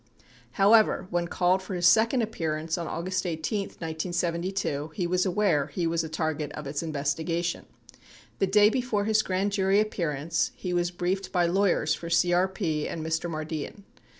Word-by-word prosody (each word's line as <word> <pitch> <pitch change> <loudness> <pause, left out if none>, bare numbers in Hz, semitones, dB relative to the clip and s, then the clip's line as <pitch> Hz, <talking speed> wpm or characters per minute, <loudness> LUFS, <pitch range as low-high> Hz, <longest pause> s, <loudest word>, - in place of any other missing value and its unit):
However, 210 0 +4
when 175 0 0
called 180 +2 +2
for 190 0 -6
his 175 -1 0
sec 220 +6 +5
ond 250 -3 +1
appearance 160 -6 -2
on 170 -2 -4
August 185 +4 -2
18, 180 +4 -2
1972, 170 -1 -3
he 180 - -1
was 180 +2 +1
aware 180 -6 +2
he 175 - -3
was 165 0 0
a 160 - -5
target 155 -2 -2
of 150 0 -7
its 140 +1 -3
investigation. 160 +3 -2 0.7
The 195 - +2
day 210 +2 +5
before 245 -5 -1
his 215 0 +3
grand 195 0 -1
jury 195 0 +2
appearance 165 -7 -1
he 180 - -4
was 175 0 +1
briefed 180 +2 -2
by 175 -1 +2
lawyers 175 -4 +2
for 170 - -6
CRP 175 -2 +1
and 160 -1 -5
Mr. 160 +2 -1
Mardian. 155 +4 -5
175 Hz, 165 wpm, -27 LUFS, 160-195 Hz, 0.7 s, sec